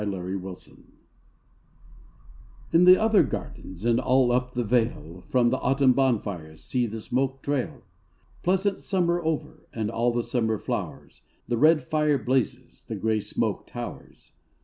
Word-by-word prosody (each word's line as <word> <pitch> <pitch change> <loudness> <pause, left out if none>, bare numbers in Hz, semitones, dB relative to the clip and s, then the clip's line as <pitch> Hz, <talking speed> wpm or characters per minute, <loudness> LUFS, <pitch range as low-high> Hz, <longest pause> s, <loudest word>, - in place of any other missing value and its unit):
AUTUMN 95 -2 -3
FIRES 95 -1 -10 1.9
In 170 +2 +6
the 185 +1 +8
other 220 -2 +4
gardens 95 +3 -5
And 120 0 +3
all 125 -1 +3
up 125 +1 -1
the 120 - 0
vale 110 -7 -1
From 120 -2 +3
the 130 - 0
autumn 135 -1 +3
bonfires 100 - -1
See 125 -2 0
the 110 +1 -6
smoke 130 +4 -2
trail! 140 -3 -2 0.6
Pleasant 190 +2 +1
summer 175 -3 0
over 160 0 -3
And 110 -1 -3
all 120 +1 +1
the 120 0 -1
summer 115 -2 0
flowers; - - -5 0.3
The 120 0 0
red 155 +2 +5
fire 150 0 +1
blazes, 130 +1 -2
The - - -5
gray 110 -1 0
smoke - - -2
towers. - - -9
125 Hz, 145 wpm, -26 LUFS, 110-145 Hz, 1.9 s, the